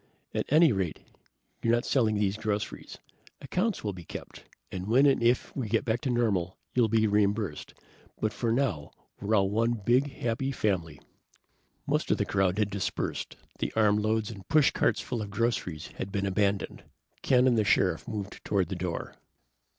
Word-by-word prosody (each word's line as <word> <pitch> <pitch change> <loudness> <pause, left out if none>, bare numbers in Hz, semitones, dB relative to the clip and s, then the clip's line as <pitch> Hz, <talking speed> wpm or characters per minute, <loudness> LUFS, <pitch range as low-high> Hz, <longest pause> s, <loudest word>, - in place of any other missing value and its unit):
At - - -1
any 155 0 +6
rate, 95 -7 -1 0.6
you're 115 0 +3
not 120 - -1
selling 115 -5 +2
these 100 -1 +1
groceries. 105 -1 -4 0.4
Accounts 180 - -1
will 105 -2 -2
be 90 -2 -9
kept, - - -9 0.3
and 95 0 -5
when 125 +6 +5
and 140 -3 +4
if 120 +1 +1
we 125 -6 -3
get 115 +5 +1
back 120 0 0
to 130 - -2
normal 105 -7 0 0.2
you'll 120 -3 +4
be 110 0 +2
reimbursed, 105 -5 0 0.4
but 110 0 0
for 115 -2 -1
now 115 - 0 0.3
we're 110 +2 +1
all 95 -2 +3
one, 115 +3 +2
big, 120 +6 +2
happy 120 +3 -2
family!" 90 - -1 0.9
Most - - 0
of - - +3
the - - 0
crowd 95 -1 +1
had 105 -2 +1
dispersed. 100 -3 -3 0.2
The - - -1
armloads 110 0 +2
and 95 -4 -11
pushcarts 155 -2 +3
full 120 -3 -3
of 105 - -5
groceries 100 -8 -2
had 95 - -4
been 100 -1 -1
abandoned. 100 0 0 0.4
Ken 125 -1 +4
and 125 -2 +4
the 110 - +3
Sheriff - - +2
moved 105 -3 -6
toward 100 -3 0
the 95 - -3
door. 90 -1 -4
110 Hz, 175 wpm, -28 LUFS, 100-120 Hz, 0.9 s, any